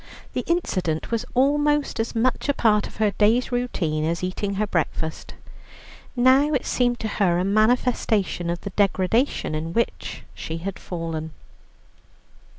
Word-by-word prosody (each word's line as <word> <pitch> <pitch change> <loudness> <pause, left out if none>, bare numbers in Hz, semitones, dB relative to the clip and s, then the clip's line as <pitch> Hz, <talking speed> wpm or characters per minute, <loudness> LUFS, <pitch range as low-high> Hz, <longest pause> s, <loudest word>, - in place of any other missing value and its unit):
The - - -1
incident 185 - -1
was 230 -1 -1
almost 295 +2 +2
as 225 +1 -2
much 255 +4 +1
a 285 - +2
part 210 -2 +3
of - - -15
her 215 -1 +2
day's 220 +6 +2
routine 180 -11 -1
as 170 +3 -1
eating 195 +2 -2
her 210 +2 +1
breakfast. 160 -4 -3 0.8
Now 265 +4 +4
it 265 - -1
seemed 245 -1 +1
to 220 - -1
her 190 -5 +1
a 180 - +1
manifestation 215 -4 +1
of 175 0 -2
the 200 - -6
degradation 200 - +1
into 155 +1 -3
which 235 - -2
she 160 - -5
had 190 +3 -5
fallen. 165 -3 -5
210 Hz, 150 wpm, -24 LUFS, 175-245 Hz, 0.8 s, Now